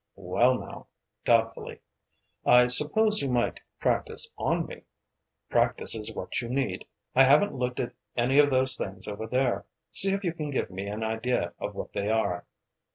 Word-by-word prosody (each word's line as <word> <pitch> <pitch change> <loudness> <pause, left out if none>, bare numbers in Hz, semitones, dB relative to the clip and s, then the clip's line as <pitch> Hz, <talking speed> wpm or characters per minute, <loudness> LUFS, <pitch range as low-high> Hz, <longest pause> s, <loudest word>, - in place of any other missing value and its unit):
"Well 115 +7 +1
now," - - -10 0.4
doubtfully 115 -1 0 0.6
"I 125 0 +6
suppose 155 - +3
you 140 - -2
might 120 -1 0 0.2
practice - - +1
on - - -1
me. - - -10 0.7
Practice - - +1
is 110 -2 -2
what - - -4
you 120 - -6
need. 135 +2 -2 0.3
I 130 - +5
haven't 145 +10 +4
looked 125 -1 -3
at 125 - -3 0.2
any 130 +4 +3
of 145 0 +5
those 130 -2 +2
things 95 -1 -5
over 105 +2 -5
there. 125 +1 -1 0.2
See 195 0 +8
if 195 +1 -2
you 175 -3 -1
can 155 -3 -5
give 135 - -2
me 95 +2 -6
an 105 +2 -4
idea 110 +3 -2
of - - -5
what - - -7
they 100 +1 -2
are." 110 -6 -1
125 Hz, 170 wpm, -27 LUFS, 110-135 Hz, 0.7 s, See